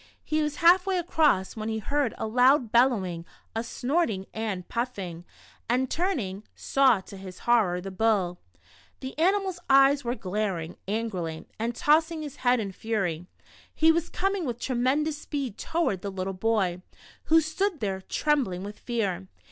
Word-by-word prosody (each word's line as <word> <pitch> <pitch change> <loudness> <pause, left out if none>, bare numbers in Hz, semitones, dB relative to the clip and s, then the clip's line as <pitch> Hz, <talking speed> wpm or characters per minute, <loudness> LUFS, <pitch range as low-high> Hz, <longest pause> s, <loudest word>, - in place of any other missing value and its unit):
He 310 0 0
was 300 -1 -1
half 355 +4 +5
way 380 -1 +1
across 310 - +2
when 220 0 -4
he 220 - -1
heard 280 +3 -1
a - - -3
loud 250 +1 +4
bellowing, 205 -9 +2 0.3
a 225 - -1
snorting 245 - -1
and 210 -5 -3
puffing, 195 -9 -4 0.4
and 255 +2 +1
turning, 255 - -1
saw, 265 -7 +3
to 195 - -11
his 190 -1 -9
horror, 215 -7 +3
the 195 +1 -6
bull! 190 -3 +1 0.6
The 260 0 -6
animal's 380 +1 +1
eyes 275 +1 +6
were 240 +1 -1
glaring 185 -5 -3
angrily, 190 -7 -3
and 230 +1 -2
tossing 315 +1 +2
his 290 -1 -8
head 245 -1 +2
in 200 -3 -3
fury, 185 -5 -2 0.5
he 320 +1 +5
was 335 +1 -1
coming 390 0 -1
with 245 -5 -3
tremendous 275 +5 0
speed 275 -8 -4
toward 290 - -1
the 200 - -4
little 190 0 -3
boy, 190 -3 0 0.4
who 325 +1 +6
stood 325 +3 -1
there, 195 -4 -2
trembling 240 -7 0
with 205 +1 -8
fear 195 -6 -2
235 Hz, 155 wpm, -27 LUFS, 195-295 Hz, 0.6 s, eyes